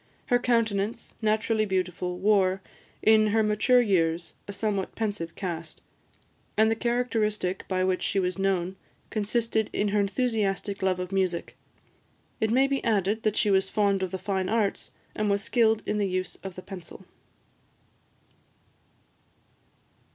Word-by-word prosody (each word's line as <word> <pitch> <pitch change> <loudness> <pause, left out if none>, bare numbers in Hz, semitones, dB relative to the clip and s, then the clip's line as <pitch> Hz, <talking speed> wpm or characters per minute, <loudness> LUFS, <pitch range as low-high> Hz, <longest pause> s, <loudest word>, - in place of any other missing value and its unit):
Her 245 - +5
countenance, 225 -3 0
naturally 215 0 +1
beautiful, 180 -2 -2
wore, 190 -1 +3 0.4
in 215 0 +6
her 220 +1 +3
mature 215 +4 +4
years, 170 -6 +1
a - - -4
somewhat 200 -1 -2
pensive 205 -7 -3
cast; 170 -4 -5 0.8
and 220 +1 +5
the - - +2
characteristic 225 -5 -1
by 185 -1 0
which 185 0 +1
she 195 - 0
was 185 0 -1
known 190 -1 0 0.3
consisted 220 0 0
in 205 - 0
her 205 +1 +1
enthusiastic 200 -2 0
love 190 -1 +1
of 180 0 -4
music. 185 -3 -1 0.8
It 220 - +1
may 260 +4 +4
be 275 0 -1
added, 210 -1 +1
that 215 -1 0
she 210 - +3
was 190 0 +3
fond 200 -2 +2
of 190 - -1
the 190 - -4
fine 190 0 -2
arts, 215 -3 0 0.3
and 215 -1 0
was 200 0 +1
skilled 220 -1 +2
in 210 - -1
the 200 -2 +1
use 185 0 -2
of 190 -2 -7
the 185 - -9
pencil. 185 -4 -10
200 Hz, 145 wpm, -27 LUFS, 185-220 Hz, 0.8 s, in